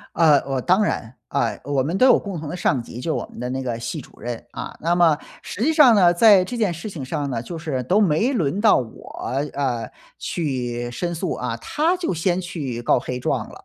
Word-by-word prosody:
呃， 155 -3 +6
我 135 -1 -1
当 185 - +3
然， 120 - -2
啊， 115 - -1
我 140 -1 0
们 160 +7 -2
都 225 - +4
有 - - +6
共 195 -4 -6
同 155 - -6
的 - - -5
上 145 -8 0
级， 115 +1 -9
就 160 +4 -1
我 - - -2
们 - - -12
的 125 - -3
那 130 +1 -3
个 120 -3 -3
系 120 +7 -4
主 - - -16
任， 120 -1 -5
啊， - - -7
那 170 +2 +1
么 170 -3 +4 0.3
实 210 - -6
际 315 - +3
上 295 -7 +7
呢， 180 -4 +5
在 195 0 +6
这 215 - -6
件 210 -6 +1
事 175 +6 -6
情 160 -7 -7
上 145 +2 -3
呢， 115 -3 -2
就 170 +7 -7
是 150 -5 -3
都 190 +9 +2
没 205 - +2
轮 185 - 0
到 215 0 +6
我， 120 -3 -5 0.5
呃， 125 -5 -2 0.3
去 125 -6 -3
申 170 +7 -3
诉， 170 +1 -2
啊， 120 -2 -3
他 320 - 0
就 350 - -2
先 175 +2 0
去 140 -9 -5
告 - - +3
黑 125 +1 -4
状 - - -2
了。 - - -14
155 Hz, 250 characters per minute, -22 LUFS, 125-185 Hz, 0.5 s, 上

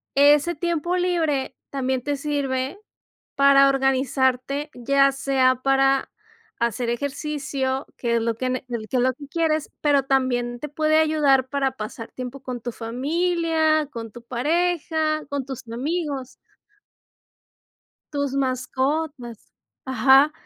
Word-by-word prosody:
ese 290 +4 +5
tiempo 340 +2 -1
libre 335 -7 0 0.2
también 260 -2 -1
te 290 +3 -2
sirve 275 +1 -2 0.6
para 275 0 +6
organizarte, 270 +1 +1
ya 275 +3 +3
sea 265 -1 +2
para 270 +1 +2 0.5
hacer 235 0 -1
ejercicio, 270 +1 -2
que 235 -1 0
es 230 - +1
lo 230 0 0
que 255 +2 -2
ne 255 0 -3
que 240 - -2
l 215 - -8
que 260 - 0
es 245 - +3
lo 260 - +2
que 285 +1 -11
quieres, 315 -1 0
pero 285 -2 +3
también 245 -3 0
te 300 - -5
puede 310 +2 +2
ayudar 285 -4 +3
para 275 -2 0
pasar 225 -2 -8
tiempo 255 +1 -7
con 255 -2 -6
tu 240 - -4
familia, 315 +6 0
con 230 -3 -7
tu 240 - -10
pareja, 315 +4 0
con 285 -2 -3
tus 260 -2 -8
amigos. 275 +2 -3 1.8
Tus 285 -2 -1
mascotas. 260 -1 -2 0.3
Ajá. 270 +3 +5
275 Hz, 130 wpm, -23 LUFS, 255-300 Hz, 1.8 s, para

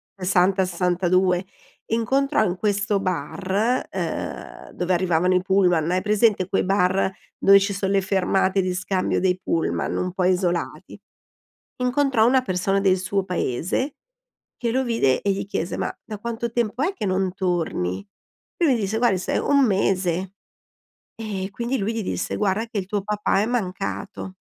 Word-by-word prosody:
60, 190 0 +2
62. 180 +1 +1 0.4
Incontrò 265 +3 +1
in 185 -3 -1
questo 200 0 0
bar, 195 +5 -1
ehm, - - -5
dove 180 +1 -1
arrivavano 180 0 +2
i 180 - +3
pullman, 180 -4 +2
hai 185 +1 +1
presente 210 -2 +2
quei 195 - +1
bar 190 0 +2 0.2
dove 195 0 +6
ci 200 +1 -1
son 195 0 -1
le 195 -1 +3
fermate 190 0 +1
di 185 -1 -1
scambio 185 +1 -1
dei 185 -1 +1
pullman, 165 - -1
un 180 - -1
po' 185 - -1
isolati? 180 -1 -1 0.8
Incontrò 250 -2 +2
una 260 +1 +4
persona 195 -2 0
del 190 -1 +3
suo 185 +1 -1
paese 180 - -2 0.6
che 235 -2 -1
lo 260 +2 +1
vide 225 - +2
e 200 - +1
gli 195 - -4
chiese: 175 -3 -3
"Ma - - -1
da 215 -2 -7
quanto 235 +2 -4
tempo 235 +1 -1
è 355 +6 +1
che 370 - -4
non 185 0 0
torni?" 175 - -1 0.5
Lui 320 -7 +3
gli - - -3
disse: 205 +2 -1
"Guardi 230 -5 +2
se 185 - -1
1 280 -1 +3
mese". 190 -3 0 0.8
E 200 -4 -4
quindi 240 +6 -2
lui 210 +1 -1
gli 225 - -2
disse: - - -3
"Guarda 210 +2 0
che 225 - -6
il 190 - -4
tuo 205 0 -1
papà 210 -1 0
è - - +1
mancato". 200 -3 -3
195 Hz, 160 wpm, -23 LUFS, 185-220 Hz, 0.8 s, dove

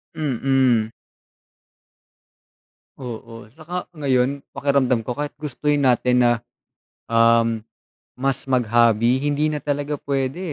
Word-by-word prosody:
Mhm. 130 -5 +1 2.1
Oo, 115 -3 -8
'tsaka 160 +9 -7
ngayon, 135 -1 0
pakiramdam 140 -3 +1
ko, 120 +2 -5
kahit 145 0 -3
gustuhin 145 0 -1
natin 125 0 +3
na, 120 -1 +4 0.8
um, 115 -1 +3 0.5
mas 135 +1 -2
mag-hobby, 120 -1 +3
hindi 145 +2 0
na 150 - -3
talaga 145 0 -3
puwede, 135 +2 -2
130 Hz, 95 wpm, -22 LUFS, 120-145 Hz, 2.1 s, na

